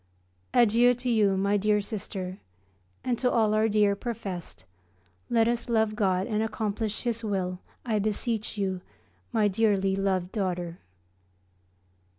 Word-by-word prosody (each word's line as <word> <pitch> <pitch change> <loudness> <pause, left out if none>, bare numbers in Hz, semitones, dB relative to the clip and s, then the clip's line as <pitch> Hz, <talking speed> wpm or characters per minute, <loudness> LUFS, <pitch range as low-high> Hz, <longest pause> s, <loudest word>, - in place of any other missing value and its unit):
Adieu 240 +1 +5
to 245 +1 -2
you, 205 -4 +3
my 200 +2 +2
dear 210 +1 +2
Sister, 195 -3 -5 0.6
and 245 -2 -1
to 250 - +2
all 220 -3 +3
our 215 +1 +3
dear 205 -1 +3
professed. 200 - -6 0.6
Let 230 -1 +3
us 235 0 -1
love 220 -2 +2
God 190 -3 +1
and 215 -2 -1
accomplish 215 -1 -2
His 235 -2 -1
will, 185 -4 -2 0.3
I 220 -3 +1
beseech 215 +1 -2
you, 190 -2 -1 0.5
my 220 -3 +3
dearly 195 -2 +2
loved 190 -2 0
daughter. 180 -4 -2
210 Hz, 135 wpm, -27 LUFS, 195-225 Hz, 0.6 s, Adieu